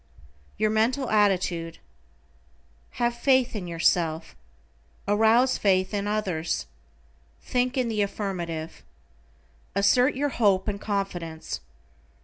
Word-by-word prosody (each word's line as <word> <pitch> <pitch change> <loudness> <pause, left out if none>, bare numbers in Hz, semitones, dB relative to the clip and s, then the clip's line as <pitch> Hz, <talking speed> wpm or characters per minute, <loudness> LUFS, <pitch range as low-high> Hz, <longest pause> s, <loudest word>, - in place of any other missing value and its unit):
=YOUR 215 0 +1
MENTAL 240 +5 +1
ATTITUDE:= 180 -5 +1 1.2
Have 240 0 0
faith 255 0 +2
in 190 -4 -4
yourself. 165 - 0 0.7
Arouse 225 +5 +3
faith 185 -1 +2
in 205 0 -1
others. 190 -6 -2 0.8
Think 250 +1 -1
in 255 -2 +1
the 220 -2 -1
affirmative. 175 -6 -4 0.9
Assert 245 +7 +3
your 290 +2 0
hope 200 -7 +2
and 200 0 -3
confidence. 175 -6 -4
205 Hz, 100 wpm, -26 LUFS, 180-235 Hz, 1.2 s, Arouse